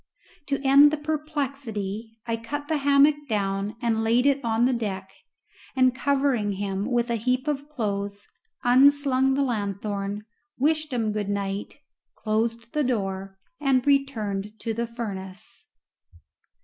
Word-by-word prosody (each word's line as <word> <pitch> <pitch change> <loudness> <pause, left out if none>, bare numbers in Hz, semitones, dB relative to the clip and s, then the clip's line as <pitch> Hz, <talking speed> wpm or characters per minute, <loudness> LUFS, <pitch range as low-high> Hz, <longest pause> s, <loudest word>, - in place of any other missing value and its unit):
To 280 -1 0
end 280 +2 +8
the 305 - -1
perplexity 275 -9 -4
I 230 -1 -1
cut 290 +6 -5
the 315 - +1
hammock 285 +1 +5
down 200 0 -1
and 225 -1 +1
laid 235 +3 +3
it 280 -1 +3
on 230 0 +2
the 260 - +2
deck, 195 -5 -3 0.6
and 255 -1 +4
covering 270 -6 +1
him 195 0 -3
with 240 -1 +1
a 235 - +1
heap 250 +5 0
of 290 0 -2
clothes, 200 -6 -3 0.4
unslung 265 +1 +4
the 280 - +2
lanthorn, 205 -3 -2 0.3
wished 310 +2 +1
him 225 -4 0
good 210 -1 -2
night, 200 0 -3 0.4
closed 230 +2 -2
the 300 - +1
door, 195 -5 -2 0.2
and 270 -3 +2
returned 220 -8 0
to 225 - -2
the 235 +1 -2
furnace. 200 -4 -7
235 Hz, 135 wpm, -25 LUFS, 205-275 Hz, 0.6 s, end